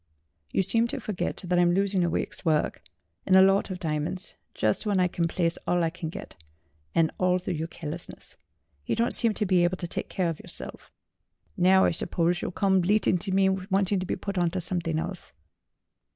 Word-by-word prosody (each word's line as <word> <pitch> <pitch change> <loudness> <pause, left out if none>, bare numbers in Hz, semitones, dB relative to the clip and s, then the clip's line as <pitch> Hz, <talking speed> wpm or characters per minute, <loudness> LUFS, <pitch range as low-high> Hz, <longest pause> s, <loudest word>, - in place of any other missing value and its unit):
"You - - +2
seem 230 +5 +2
to - - -4
forget 205 -1 -4
that 180 0 +1
I'm 175 0 +4
losing 195 -1 +1
a 170 - +1
week's - - -2
work, 155 -2 0 0.5
and 185 - +5
a 190 - +9
lot 195 +1 +3
of 185 - -4
diamonds 160 +3 -2 0.2
just 110 -1 +1
when 200 -2 +2
I 180 - +4
can 170 -1 -1
place 165 0 0
all 175 -1 +2
I 165 - 0
can 165 -2 -6
get, 80 - -10 0.5
and 160 -1 +3
all 180 0 +3
through 185 0 -4
your 160 0 -3
carelessness. 165 0 -7 0.5
You - - -1
don't 235 +2 +1
seem 230 -3 +2
to 210 - 0
be 180 -2 +3
able 175 +1 +1
to 175 - -3
take - - -4
care 185 -2 -1
of 165 - -5
yourself. - - -6 0.7
Now 190 +1 +5
I - - +3
suppose 170 +1 0
you'll - - -2
come 190 +1 +2
bleating 190 -1 +2
to 190 +3 -3
me 190 0 +3
wanting 190 +1 0
to 185 - -4
be - - -1
put 200 -2 -4
on 175 -1 +2
to 185 +2 -3
something 165 -2 -1
else." 170 - -5
180 Hz, 210 wpm, -27 LUFS, 170-190 Hz, 0.7 s, a